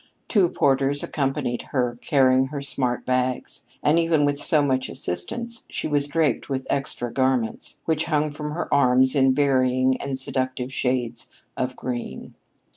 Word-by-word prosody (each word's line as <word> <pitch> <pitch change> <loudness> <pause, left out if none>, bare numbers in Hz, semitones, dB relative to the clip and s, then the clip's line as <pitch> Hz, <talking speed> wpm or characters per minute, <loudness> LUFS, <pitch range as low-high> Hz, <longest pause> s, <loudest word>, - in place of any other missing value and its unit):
Two 195 -6 +3
porters 140 0 +1
accompanied 135 -4 -1
her, 125 -3 0
carrying 130 -2 +3
her 145 +1 -5
smart 130 -3 -2
bags, 125 0 -2 0.2
and, 155 +3 +4
even 165 -3 +3
with 145 0 0
so 150 0 +3
much 130 -2 0
assistance, 235 - -4
she - - -3
was 145 -1 +1
draped 155 0 0
with 135 -1 -2
extra 120 -3 -2
garments, 130 -3 0
which 160 -1 +1
hung 150 -2 0
from 150 0 -5
her 170 - -3
arms 130 -1 +4
in 135 -2 +4
varying 130 -2 +2
and 140 -1 -3
seductive 130 -1 -3
shades 125 -3 -2 0.3
of 130 0 -2
green. 120 - -5
135 Hz, 150 wpm, -24 LUFS, 130-145 Hz, 0.3 s, and